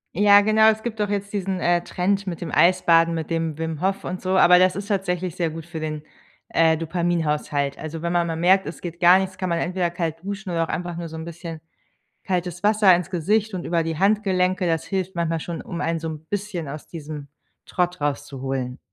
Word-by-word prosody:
Ja 205 +2 +7
genau, 220 +1 +5
es 220 0 0
gibt 220 -3 -4
doch 205 -1 0
jetzt 200 0 -3
diesen, 190 -2 -2
äh, 175 0 +2
Trend 195 +2 -1
mit 170 -3 -4
dem 170 - -4
Eisbaden, 170 -2 +4
mit 160 -2 -4
dem 165 -2 -2
Wim 160 -1 -4
Hof 195 +1 0
und 180 +1 -5
so, 185 0 +1
aber 180 -1 +7
das 185 0 +4
ist 200 0 -5
tatsächlich 185 -4 -1
sehr 170 -2 0
gut 160 0 -8
für 170 -2 -7
den, 155 -1 -4 0.5
äh, 160 -1 +3
Dopaminhaushalt. 155 -4 -1
Also 160 +1 -6
wenn 170 +1 -2
man 175 -1 +2
mal 165 -1 -3
merkt, 190 +3 +4
es - - -7
geht 170 -1 -7
gar 180 +2 +7
nichts, 190 0 -4
kann 185 -1 -2
man 170 0 0
entweder 180 0 -1
kalt 165 -1 -4
duschen 200 -1 -5
oder 165 -1 +1
auch 165 - -5
einfach 175 -1 -3
nur 170 -1 -5
so 160 - -8
'n 160 - -6
bisschen 170 -1 -7 0.7
kaltes 180 -1 -2
Wasser 205 -3 +5
ins 180 +1 -5
Gesicht 205 +5 0
und 180 -2 -4
über 170 -1 +1
die 160 -1 -3
Handgelenke. 190 -2 +2
Das 165 -1 0
hilft 190 -1 -3
manchmal 165 -1 -1
schon, 170 +1 -5
um 175 -1 -6
einen 165 0 0
so 160 - -4
'n 155 0 -7
bisschen 195 -5 -4
aus 150 +2 -7
diesem 150 -3 -8 0.4
Trott 180 -1 -1
rauszuholen. 135 -3 -3
175 Hz, 220 wpm, -23 LUFS, 165-190 Hz, 0.7 s, Ja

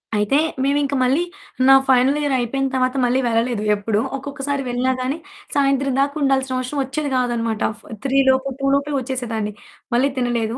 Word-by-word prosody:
అయితే 210 +7 +2 0.3
మేమింక 280 0 +1
మళ్ళీ 270 +7 +2 0.5
నా 270 - +9
ఫైనల్ 260 +3 +4
ఇయర్ 290 -2 0
అయిపోయిన 270 +3 -1
తర్వాత 255 0 +1
మళ్ళీ 245 +2 +2
వెళ్ళలేదు 230 -1 0
ఎప్పుడు. 205 +1 -1 0.2
ఒక్కొక్కసారి 280 0 -4
వెళ్ళినా 250 +1 +1
గానీ, 270 +5 -2 0.4
సాయంత్రం 275 -1 +2
దాకుండాల్సిన 270 -2 0
అవసరం 255 +3 -3
ఒచ్చేది 285 +2 -3
కాదన్నమాట. 235 -3 -1
ఆ - - -11
ఫ - - -20 0.2
3 270 0 +1
లోపు 265 +1 +2
2 275 - -2
లోపే 280 +1 -1
ఒచ్చేసేదాన్ని. 235 -5 -3 0.4
మళ్ళీ 265 +4 +3
తినలేదు. 240 -1 -1
260 Hz, 160 wpm, -20 LUFS, 240-275 Hz, 0.5 s, నా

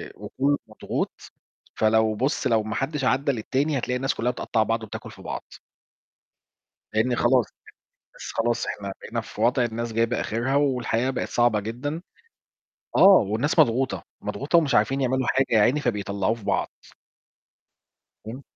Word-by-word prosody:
وكلّه 145 +2 -1
مضغوط - - -4 0.5
فلو 110 0 +3
بُص 135 +7 0
لو 110 -2 +2
ما 110 +1 -4
حدش 145 +1 -2
عدّي 135 +2 +2
للتاني 135 +5 -1
هتلاقي 125 0 -2
الناس 135 +2 0
كلّها 120 +2 0
بتقطّع 115 -2 0
بعض 115 +1 -1
وبتاكُل 110 - -8
في - - -14
بعض. - - -5 1.5
لإن 115 +3 +2
خلاص 120 0 +3 0.7
بس - - -7
خلاص 120 +1 0
إحنا 100 -1 -5
بقينا 115 +1 -4
في 110 - -10
وضع 120 +2 +3
الناس 115 0 -3
جايبة 115 +1 +1
آخِرها 120 +5 -1
والحياة 130 -3 +1
بقت - - -3
صعبة 120 -3 +2
جدًا. 130 - -4 0.9
آه، - - +3 0.3
والناس 120 - 0
مضغوطة، 130 -2 +3 0.2
مضغوطة 150 +5 +1
ومش 150 -4 +1
عارفين 135 +1 +2
يعملوا 130 -1 0
حاجة 135 +2 +2
يا 110 - +4
عيني 125 +8 +3
فبيطلّعوه 100 -4 -1
في 115 - -13
بعض. 100 -1 0 1.6
إمم. 125 +5 -7
120 Hz, 150 wpm, -25 LUFS, 110-135 Hz, 1.6 s, يا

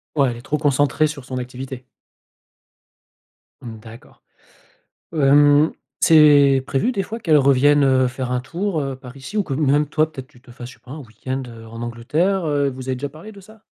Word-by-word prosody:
Ouais 135 -4 +2
elle 120 - -7
est - - -11
trop 150 +4 -2
concentrée 145 +1 +1
sur 150 -3 -5
son 130 0 -6
activité. 125 +1 -7 1.8
Mmh 115 -3 -9
d'accord. 110 +1 -15 0.9
Hem, 145 +1 +4 0.3
c'est 145 -4 +5
prévu 140 - 0
des 195 -6 -2
fois 225 +5 -7
qu'elle 160 -8 +3
revienne, 140 +1 +4
heu, 130 -1 +3
faire 125 0 -5
un 125 - -1
tour, 170 +4 -3
heu, 135 -1 -4
par 130 -1 -13
ici? 140 +11 -7
Ou 205 - +2
que 140 - -5
même 145 +1 +1
toi 155 +1 0
peut-être, 130 -3 -9
tu 120 - -22
te 125 - -17
fasses, 120 0 -10
je - - -13
sais - - -29
pas 125 - -13
un 150 - -7
week-end, 130 +2 -6
heu, 115 -1 -12
en 115 +1 -9
Angleterre, 150 +11 -1
heu, 145 -2 0
vous 130 0 -8
avez 130 - 0
déjà 140 +3 -5
parlé 165 +9 -12
de 200 - -14
ça? 215 +2 -18
140 Hz, 205 wpm, -20 LUFS, 130-155 Hz, 1.8 s, c'est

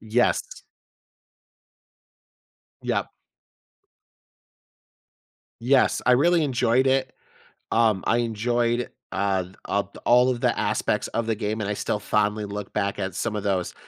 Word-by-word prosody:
Yes. 110 +3 0 2.2
Yep. - - -1 2.5
Yes, 130 +3 +3
I 125 - +6
really 170 +6 +4
enjoyed 130 -2 +2
it. 130 -1 +1 0.6
Um, 110 -4 +3
I 115 - +3
enjoyed, 120 +1 0 0.2
uh, 95 -1 0
the 90 +2 -15
up 100 0 -2
all 125 +1 +5
of 125 -2 -1
the - - +1
aspects - - 0
of 115 -1 -2
the 115 - +1
game, 105 +1 -3
and 105 -1 -2
I 105 - 0
still 105 - -2
fondly 105 +1 0
look 100 0 -6
back 100 -1 -1
at 95 -1 -3
some 115 -2 -2
of 105 - -3
those 95 -3 -1
110 Hz, 130 wpm, -24 LUFS, 100-125 Hz, 2.5 s, I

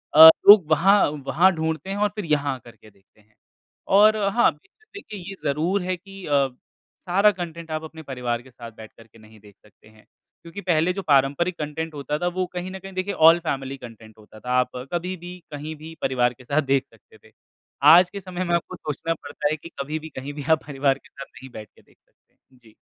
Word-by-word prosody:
अ, 160 +1 +12 0.2
लोग 200 -7 +9
वहाँ 195 +6 +5 0.3
वहाँ 185 +4 +4
ढूँढते 160 +2 -3
हैं 200 - -3
और 210 0 +1
फ़िर 210 -4 -5
यहाँ 145 -3 0
आ - - -9
करके 115 -3 -17
देखते 100 +2 -29
हैं। 105 +1 -34 0.5
और 215 +2 +5 0.2
हाँ, 240 - +4 0.4
देखिये 210 - -9
ये 195 - -7
ज़रूर 165 +7 0
है 185 0 -2
कि 195 +1 -12
अ, 140 -2 +2 0.6
सारा 200 +4 +4
कंटेंट 170 -3 -8
आप 155 0 -3
अपने 160 0 -10
परिवार 125 -3 -3
के 130 +1 -18
साथ 120 -1 -11
बैठ 110 -1 -11
करके 115 0 -18
नहीं 110 0 -18
देख 100 -1 -19
सकते 105 +1 -23
हैं। 110 0 -21 0.4
क्योंकि 170 +4 -9
पहले 175 0 +1
जो 195 - -4
पारंपरिक 145 +4 +1
कंटेंट 155 +2 -5
होता 150 +1 -3
था 175 - -1
वो 185 0 0
कहीं 180 +1 -5
न 190 - -7
कहीं 195 0 -11
देखिए 185 +2 -3
ऑल 170 +1 +7
फैमिली 135 0 -3
कंटेंट 110 -3 -13
होता 110 0 -16
था। 125 - -9
आप 125 - 0 0.2
कभी 180 +2 -2
भी 175 +1 -10 0.2
कहीं 150 +2 -6
भी 160 +2 -11
परिवार 125 -2 +1
के 125 - -18
साथ 140 +5 0
देख 135 -1 0
सकते 115 -2 -23
थे। - - -31 0.6
आज 180 +1 +6
के 200 - -7
समय 185 -1 -5
में 170 0 +1
आपको 170 - -3
सोचना 155 +2 -4
पड़ता 145 0 -4
है 155 - -1
कि 170 - -12
कभी 155 +3 -4
भी 160 +1 -10
कहीं 140 +1 -8
भी 145 -1 -7
आप 160 - +3
परिवार 135 -1 0
के - - -22
साथ 140 0 -10
नहीं 130 0 -14
बैठ 110 -1 -10
के - - -21
देख - - -29
सकते। - - -45 0.3
जी। 110 -1 -20
155 Hz, 225 wpm, -23 LUFS, 130-180 Hz, 0.6 s, अ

